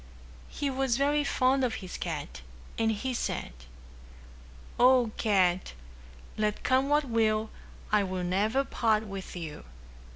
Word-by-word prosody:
He 280 -1 -2
was 260 -2 0
very 290 +2 +2
fond 265 -1 +2
of 245 -3 0
his 185 -2 -7
cat, 155 - -5 0.3
and 225 0 +1
he 255 +5 -2
said, 235 - -3 1.3
"O, 250 -2 +5
Cat, 185 -4 +1 0.6
let 210 -1 -1
come 260 +2 +2
what 295 0 +3
will, 220 -2 +1 0.4
I'll 210 -2 +3 0.2
never 210 +9 +1
part 220 -5 +1
with 195 -3 -7
you. 160 -4 -7
225 Hz, 125 wpm, -29 LUFS, 195-260 Hz, 1.3 s, O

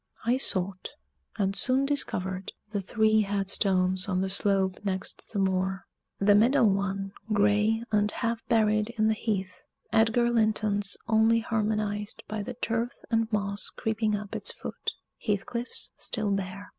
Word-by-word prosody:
I 240 +2 +3
sought, 190 -6 0 0.5
and 195 -1 0
soon 265 +4 +3
discovered, 190 -10 -1 0.2
the 205 -2 -2
three 220 +2 +3
headstones 195 -2 +1
on 185 -1 +1
the 190 0 -1
slope 195 -1 +1
next 190 -2 -4
the 210 - -4
moor 190 0 0 0.3
the 205 +1 +4
middle 225 +1 +5
one, 195 0 -2 0.2
gray, 210 +2 +3
and 210 -1 +3
half 230 -1 -2
buried 215 -2 +2
in 215 0 +3
the - - +3
heath 195 -4 -3 0.3
Edgar 230 +2 +3
Linton's 215 -3 +1
only 225 0 +4
harmonized 210 -2 -2
by 215 0 -3
the 240 +4 -6
turf 230 0 -1 0.2
and 225 0 +1
moss 200 -1 -1
creeping 220 -1 -1
up 205 -1 -6
its - - +2
foot - - -5 0.3
Heathcliff's 235 +3 -3
still 215 -3 -2
bare. 195 0 -3
210 Hz, 145 wpm, -28 LUFS, 195-225 Hz, 0.5 s, middle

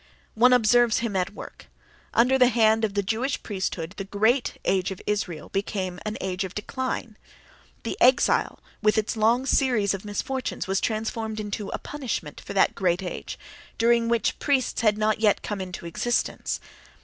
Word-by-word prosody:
One 245 +3 +5
observes 240 -1 +4
him 230 -4 -2
at 185 +2 -1
work: - - -10 0.4
under 255 +3 +3
the 250 - +7
hand 225 -2 +3
of 210 -2 0
the 200 - +1
Jewish 230 +7 -1
priesthood 185 -4 -3
the 195 - -3
great 220 +6 +1
age 185 -2 +1
of 190 - -6
Israel 190 -7 -2
became 190 -2 -3
an 215 - -3
age 190 0 -2
of 190 0 -7
decline; 235 0 -4 0.7
the - - -3
Exile, 255 +1 +4 0.2
with 215 0 +3
its 220 +1 0
long 230 +4 +2
series 245 -8 +2
of 195 - -5
misfortunes, 250 +5 -3
was 195 0 0
transformed 220 0 -2
into 210 -1 -4
a - - -3
punishment 250 - -5
for - - -7
that 195 - +3
great 180 -1 0
age—during 230 +5 -2
which 235 -1 0
priests 275 -4 +1
had 210 -2 +3
not 215 0 +1
yet 215 -2 +2
come 205 -2 -3
into 180 -2 -7
existence. 240 +8 -1
215 Hz, 165 wpm, -25 LUFS, 195-235 Hz, 0.7 s, the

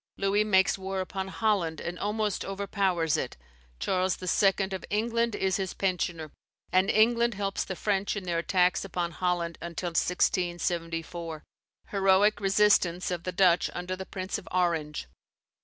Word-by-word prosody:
Louis 200 +2 +2
makes 195 -2 +3
war 190 0 -3
upon 190 +1 -3
Holland, 180 -3 0
and 175 +1 -5
almost 210 -1 -1
overpowers 195 -5 0
it, - - -4 0.4
Charles 185 - 0
II. 195 +1 +2
of 190 - -4
England 230 +2 0
is 190 -1 0
his 190 -2 -3
pensioner, 175 -5 -2 0.4
and 185 +2 +3
England 235 +1 +3
helps 195 0 -1
the 190 - -5
French 200 +1 0
in 205 - -4
their 170 -2 -1
attacks 180 +1 +2
upon 175 -3 -3
Holland 175 -1 -1
until 170 +1 -4
1674. 170 -2 -1 0.5
Heroic 195 +1 +3
resistance 195 -3 +3
of 175 -1 -4
the 185 - -1
Dutch 180 -3 +3
under 180 +1 -3
the 190 0 -8
Prince 185 0 -4
of 175 - -16
Orange. 165 - 0
185 Hz, 145 wpm, -28 LUFS, 175-195 Hz, 0.5 s, makes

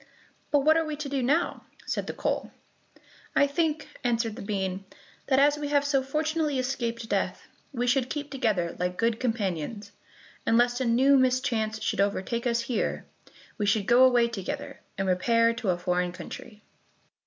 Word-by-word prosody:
"But 290 -1 +3
what 310 +3 +5
are 325 - +2
we 310 -1 -4
to 295 -1 -5
do 275 -1 -1
now?" 295 +8 0 0.2
said - - -2
the - - -3
coal. - - -2 0.8
"I 285 - +5
think," 305 +1 -1 0.2
answered 230 -3 0
the 245 - -8
bean, 195 -2 -3 0.4
"that 265 - +3
as 290 +2 +4
we 295 - -3
have 285 0 +2
so 280 -2 +2
fortunately 305 +1 -1
escaped 235 -3 -2
death, - - -2 0.2
we 245 -3 -2
should 255 +1 +1
keep 295 -1 -4
together 210 -10 0
like 180 0 -2
good 230 0 +1
companions, 205 -3 -2 0.5
and 230 - +3
lest 245 +1 +2
a - - +1
new 260 +4 +5
mischance 245 -4 +1
should - - 0
overtake 205 +4 -1
us 235 0 +1
here, 235 0 -2 0.5
we 205 - 0
should 205 -1 +2
go 240 +3 +6
away 245 -2 +5
together, 200 -6 -5 0.2
and 195 0 -1
repair 230 +5 +3
to 230 -3 -3
a 175 - +2
foreign 180 0 -1
country." 205 +4 -10
240 Hz, 175 wpm, -27 LUFS, 210-275 Hz, 0.8 s, go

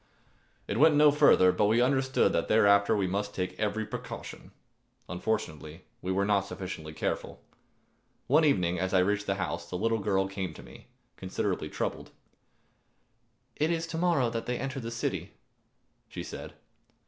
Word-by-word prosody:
It 100 - -2
went 155 +1 +6
no 150 0 +6
farther, 95 -10 +5
but 90 +3 +1
we 110 +3 +3
understood 130 +1 +2
that 85 - 0
thereafter 100 0 +4
we 100 - +1
must 100 +2 -3
take 90 0 -2
every 110 +1 -1
precaution. - - -8 0.6
Unfortunately 90 -4 -4 0.2
we 90 - -3
were 100 +1 +1
not 100 -1 +1
sufficiently 80 -5 -6
careful. 80 - -3 0.9
One 150 +5 +4
evening 90 - +2
as 95 +1 -1
I - - +6
reached 105 +2 0
the 95 - +1
house, 95 -2 -4
the 90 - -3
little 115 +3 0
girl 95 -1 +1
came 95 -1 -5
to - - -11
meet - - -14
me, - - -15 0.3
considerably - - -3
troubled. - - -4 1.5
"It 155 +2 +1
is 165 -1 -1
to 165 0 -5
morrow 165 -9 +2
that 115 0 -4
they 125 0 -1
enter 135 +1 -4
the 115 -2 -5
city," 115 0 -3 0.8
she - - -6
said. - - -8
105 Hz, 165 wpm, -29 LUFS, 95-125 Hz, 1.5 s, went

